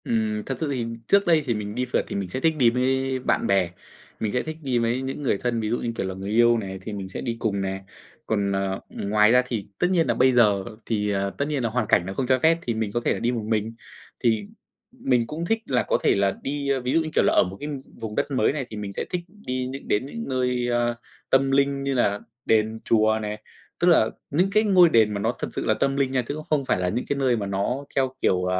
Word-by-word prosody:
Ừm, 110 -2 -1
thật 135 - -3
sự 160 - -1
thì 125 -4 -1 0.2
trước 200 0 +4
đây 160 -3 +4
thì 120 - +1
mình 105 -1 -4
đi 125 +1 0
phượt 125 - 0
thì - - -5
mình 100 -2 -3
sẽ 130 - -3
thích 160 +3 +2
đi 120 -4 +5
mới 130 +1 0
bạn 125 - 0
bè, 95 -3 +2 0.5
mình 110 - -1
sẽ 125 - 0
thích 160 0 -6
đi 130 -3 +1
mới 115 +2 0
những 135 +2 -4
người 125 - +1
thân, 120 +1 -1
ví 110 -1 -2
dụ, 120 - +1
như 115 - -3
kiểu 95 - -2
là, 95 - -4
người 95 +1 -6
yêu 120 +1 +5
này, 95 -3 -5
thì 105 +3 -6
mình 95 -2 -5
sẽ - - -6
đi 120 -3 -2
cùng 100 -4 -1
nè, 95 0 -3 0.4
còn, 100 -2 0
ờ, 95 0 -1
ngoài 105 +2 +2
ra 125 +1 +6
thì 115 -5 -3
tất 180 - +3
nhiên 170 -5 +2
nà 120 - +2
bây 130 +2 +4
giờ 105 -5 +4 0.2
thì, 105 -2 -1
ờ, 100 -1 0
tất 140 - 0
nhiên 145 -4 -1
là 115 - +1
hoàn 115 -1 -1
cảnh 85 - +3
nó 95 - -4
không 130 +4 -2
cho 130 0 +3
phép 160 +4 +4
thì 120 - -2
mình 110 -2 -2
có 120 - 0
thể - - +3
là - - -4
đi 120 - +1
một 115 -3 -3
mình. 110 0 -1 0.5
Thì 110 -4 +1 0.5
mình 120 -3 0
cũng 160 +5 -4
thích 225 +5 +1
là 125 -2 +1
có - - +1
thể - - +4
là 100 0 +1
đi, 140 0 -2
ơ, 135 -1 +2
ví 125 +1 -1
dụ, - - +4
như 160 - -3
kiểu - - +3
là, - - +3
ở - - +5
một 95 +1 -6
cái 145 - -5 0.3
vùng 110 -1 -5
đất - - -1
mới 130 - +2
này, 140 -3 -3
thì 110 - -7
mình 100 -1 -5
sẽ - - -2
thích 180 - -2
đi 130 -11 -4
những 135 +1 -7
đến 105 +5 +1
những 230 +12 -6
nơi 125 -1 0 0.6
tâm 135 0 +3
linh 140 0 +2
như 140 0 0
là 105 -5 +1 0.3
đền, 110 0 +2
chùa 110 -1 +3
này, 105 0 -5 0.4
tức 175 - +2
là 155 -11 +5 0.2
những 180 +7 +2
cái 215 +2 +4
ngôi 185 -5 +6
đền 110 -6 +4
mà 100 - -2
nó 115 +4 0
thật - - -2
sự - - -3
là 110 - +3
tâm 135 +5 0
linh 135 -2 +1
nha, 130 -1 +1
chứ - - -2
cũng 155 - -6
không 145 -3 +1
phải 90 - +1
là 90 0 0
những 120 +6 -2
cái 145 - -2
nơi 130 -3 +2
mà 105 - -3
nó 100 +8 -2
theo 130 -1 +1
kiểu, 90 0 +2
120 Hz, 280 wpm, -24 LUFS, 105-135 Hz, 0.6 s, ra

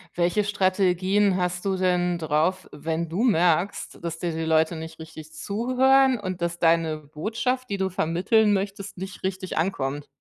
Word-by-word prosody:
Welche 175 +4 +1
Strategien 190 0 +2
hast 180 0 -2
du 195 -1 0
denn 180 -1 +1
drauf, 160 +4 0
wenn 160 +3 -3
du 180 +9 -2
merkst, 175 -4 +1
dass 165 -1 -4
dir 170 -1 -2
die 160 0 -3
Leute 160 +1 +2
nicht 160 0 -8
richtig 160 -1 -10
zuhören 255 +8 +2
und 185 -3 -5
dass 170 0 -2
deine 165 -2 +2
Botschaft, 220 - -3
die 200 - -2
du 190 0 0
vermitteln 185 +6 +2
möchtest, 200 0 -3
nicht 190 +1 -8
richtig 190 -1 -3
ankommt? 145 -4 -2
180 Hz, 160 wpm, -25 LUFS, 165-200 Hz, -, Strategien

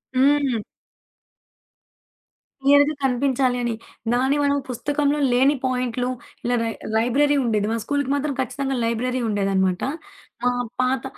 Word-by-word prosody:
హ్మ్. 275 -1 +3 2.0
క్లియర్‌గా 285 +2 +5
కనిపించాలి 260 -1 +1
అని. 240 -1 0 0.4
దాని 260 +3 +2
మనం 285 0 +2
పుస్తకంలో 290 +3 0
లేని 265 +4 +4
పాయింట్లు 250 -1 -1 0.3
ఇలా 245 +1 +1
రై 225 - -1 0.2
లైబ్రరీ 270 +6 +3
ఉండేది. 210 -3 +1
మా 230 - 0
స్కూలికి 285 +1 -1
మాత్రం 285 0 -1
ఖచ్చితంగా 270 +1 -2
లైబ్రరీ 240 +3 -1
ఉండేదనమాట. 195 -3 +1 0.6
మా 245 - +3 0.3
పాత 255 0 0
255 Hz, 115 wpm, -23 LUFS, 235-280 Hz, 2.0 s, క్లియర్‌గా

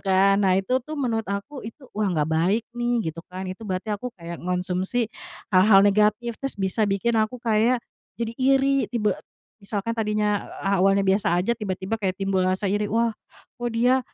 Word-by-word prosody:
kan, 195 +1 +3
nah 190 -2 +3
itu 195 +7 +1
tuh 305 +5 -7
menurut 230 -6 -1
aku 200 +8 -4
itu, 260 +4 -11
'Wah 210 -1 0
gak 150 0 +1
baik 185 +8 +2
nih," 240 -6 0
gitu 165 +1 -9
kan, 185 +1 -6
itu 185 +4 -7
berarti 195 +3 -2
aku 210 +5 -3
kayak 170 -1 -7
ngonsumsi 180 +6 -1 0.4
hal-hal 195 +2 +7
negatif, 210 +3 +2
terus 275 -4 -3
bisa 195 +3 +1
bikin 215 +4 +1
aku 215 +3 -1
kayak 230 +2 +2 0.4
jadi 230 -1 -1
iri 270 +1 +3
tiba 210 -5 0 0.4
misalkan 205 +2 -3
tadinya 210 -2 0 0.2
awalnya 195 0 +3
biasa 195 -1 +2
aja 190 - -1
tiba-tiba 195 0 -3
kayak 190 -2 0
timbul 195 -1 0
rasa 185 +2 0
iri, 205 +1 0
"Wah 230 +2 +2 0.5
kok 240 0 -2
dia, 250 +3 +3
210 Hz, 175 wpm, -24 LUFS, 190-235 Hz, 0.5 s, hal-hal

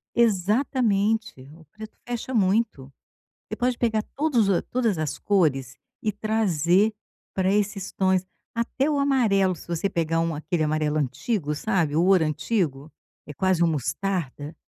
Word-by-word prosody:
Exatamente, 215 - +1
o 160 -1 -17
preto 215 +7 -11
fecha 245 +2 -4
muito. 195 - +1 0.6
Você - - -3
pode 245 0 0
pegar 220 -3 +1
todos 275 -8 +2
os 185 - +2
todas 230 -7 0
as 155 -1 -2
cores 135 -11 +1 0.3
e 215 - +1
trazer 205 -2 +1 0.4
para 190 0 +1
esses 205 -1 -1
tons. 185 -1 +1 0.3
Até 245 +5 -1
o 290 - +1
amarelo, 210 -10 +2
se - - -14
você 170 +3 -1
pegar 165 -1 0
um 165 -1 0
aquele 160 +1 -1
amarelo 155 0 0
antigo, 150 - -1
sabe, 165 -5 0
o 165 - +3
ouro 185 -4 +4
antigo, 155 - -2 0.4
é 150 - -7
quase 185 +1 +1
um - - +4
mostarda? 155 0 -3
190 Hz, 145 wpm, -25 LUFS, 155-220 Hz, 0.6 s, ouro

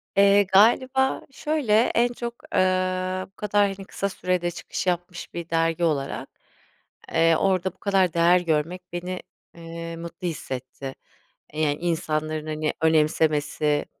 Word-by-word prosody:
Eee, 200 +1 +6
galiba 255 +7 +3
şöyle: 295 -6 -1 0.2
en 240 +1 +4
çok, 235 0 -6
ııı, 185 0 +1
bu - - -66
kadar 205 0 +2
hani 195 0 -10
kısa 200 - -2
sürede 180 -2 -1
çıkış 180 - -5
yapmış 175 0 -3
bir 170 -1 -6
dergi 165 +1 +1
olarak, 140 -4 -1 0.8
eee, 165 0 +4
orada 190 -2 +1
bu - - -34
kadar 190 -4 +2
değer 170 +2 +5
görmek 165 +2 -1
beni, 180 +1 -4 0.3
eee, 165 0 -7
mutlu 170 +2 -6
hissetti. 135 -3 -6 0.5
E, 155 +1 -4
yani 145 -1 +2
insanların 155 -2 -2
hani 155 0 -1
önemsemesi, 150 -1 +2
175 Hz, 135 wpm, -24 LUFS, 160-190 Hz, 0.8 s, Eee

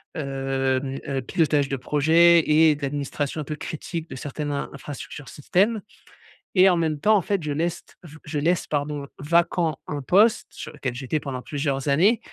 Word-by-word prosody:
hem 135 -2 -1
heu, 135 -1 -2
pilotage 150 0 +1
de 140 - -1
projets 160 +6 +4
et 155 0 +5
d'administration 145 +1 -3
un - - -4
peu 150 +2 -5
critique 165 +1 -6
de - - -7
certaines 145 +2 -4
in 140 - -3
infrastructures 140 0 -8
système. 200 +9 +1 0.7
Et 185 0 +7
en 185 - +5
même 160 -3 0
temps 215 +8 +4
en 200 - +3
fait 200 +2 -1
je 150 - -3
leste 165 +3 -3
je 160 -2 -12
je 150 - -3
laisse, 170 +3 +1
pardon, 145 -1 -2
vacant 170 0 +1
un 145 -1 -4
poste 205 - +3
sur - - -9
lequel 125 -2 -4
j'étais 135 +4 -2
pendant 130 -3 -5
plusieurs 140 -2 -2
années, 185 +12 +4
150 Hz, 175 wpm, -24 LUFS, 140-170 Hz, 0.7 s, Et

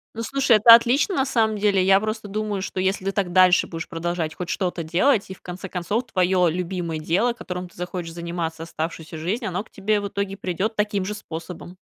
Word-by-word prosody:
Ну, 230 - -4
слушай, 270 0 +3
это 230 +2 +9
отлично, 255 - +4
на 265 - +2
самом 220 -5 +1
деле. 200 -2 +2
Я 195 +1 +5
просто 215 0 -4
думаю, 210 -1 -3
что, 190 - -4
если 190 0 0
ты 195 - +1
так 195 -3 -1
дальше 185 0 +5
будешь 165 -1 -6
продолжать 165 -1 -3
хоть 180 0 -6
что-то 180 -3 -2
делать, 195 - +2
и, - - -5
в - - -18
конце 185 +2 -7
концов, 200 +7 -2
твое 180 -2 +3
любимое 170 -2 -3
дело, 190 +10 +1
которым 180 -6 -6
ты 175 - -22
захочешь 175 -1 -5
заниматься 170 -1 -4
оставшуюся 160 0 -5
жизнь, 195 +10 -2
оно 190 0 -2
к - - -23
тебе 205 +1 0
в 200 - -3
итоге 200 0 -3
придет 190 +4 -2
таким 210 -2 0
же 210 - -3
способом. 175 -2 -8
190 Hz, 210 wpm, -23 LUFS, 175-210 Hz, -, это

